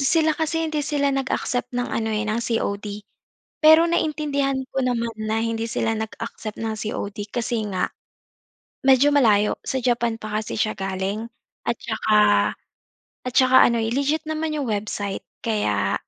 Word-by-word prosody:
Sila 315 +3 +3
kasi 325 +1 -1
hindi 310 -2 -1
sila 285 -1 0
nag-accept 260 -2 -1
ng 245 - 0
ano, 220 -1 -1
eh, 215 - -1
ng 215 +2 -1
COD. 210 -3 -2 0.6
Pero, 315 +2 +8
naiintindihan 295 -4 0
ko - - -2
naman 235 -2 -1
na 215 +1 -1
hindi 230 0 -2
sila 225 0 0
nag-accept 220 0 -6
ng 225 -1 -2
COD, 210 -1 -4
kasi 235 -1 -1
nga, 185 - 0 1.0
medyo 270 +2 +6
malayo, 210 -7 +4
sa 265 - -1
Japan 235 -2 +1
pa 215 0 -2
kasi 215 - -5
siya 215 0 +1
galing. 195 +3 -3 0.4
At - - +1
saka 220 -1 +1 1.1
at 250 - -2
tsaka 260 0 +7
ano, 235 -1 +1
eh, 225 +1 -1
legit 285 +4 0
naman 315 0 -2
'yong 285 -3 -2
website. 205 -2 -3 0.2
Kaya 205 - 0
230 Hz, 155 wpm, -23 LUFS, 215-280 Hz, 1.1 s, Pero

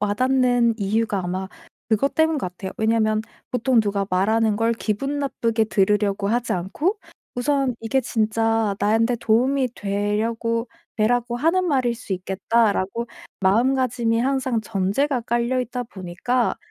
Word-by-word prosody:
와닿는 245 +2 +2
이유가 210 +1 0
아마 185 +2 -3 0.4
그것 225 +5 +1
때문인 320 -1 +2
것 185 - -2
같아요. 190 +1 -7
왜냐면 220 -1 +2 0.3
보통 250 -1 +2
누가 200 -2 -1
말하는 215 +3 +2
걸 225 +1 +2
기분 250 +6 -2
나쁘게 230 -5 0
들으려고 200 0 +1
하지 240 +1 0
않고 290 - -1 0.4
우선 270 0 0
'이게 230 +4 +1
진짜 225 -2 0
나한테 225 +4 +2
도움이 250 +4 +2
되려고 225 +3 -1 0.3
되라고 240 +2 +1
하는 335 +7 +2
말일 255 -5 +1
수 220 -4 -7
있겠다.'라고 200 +3 0 0.3
마음가짐이 235 +2 +2
항상 260 -3 0
전제가 220 +7 0
깔려있다 245 +1 -1
보니까 205 +5 -2
230 Hz, 310 characters per minute, -22 LUFS, 205-250 Hz, 0.4 s, 와닿는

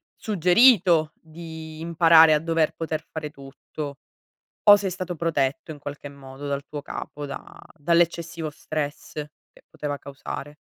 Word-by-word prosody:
suggerito 180 -4 +4
di 160 -1 -10
imparare 165 -1 +6
a 150 - +3
dover 165 -1 +1
poter 160 -1 -4
fare 155 -2 -5
tutto? 140 0 -8 0.7
O 205 - +12
sei 200 -1 -1
stato 180 0 -5
protetto, 160 -1 -1
in 150 - -9
qualche 145 0 -7
modo, 140 0 -11
dal 140 0 -2
tuo 150 -1 -7
capo 145 0 -6
da 140 -1 -9 0.2
dall'eccessivo 170 0 0
stress 150 0 -5
che 150 -1 -10
poteva 145 -1 -4
causare? 140 +1 -8
155 Hz, 135 wpm, -24 LUFS, 145-170 Hz, 0.7 s, O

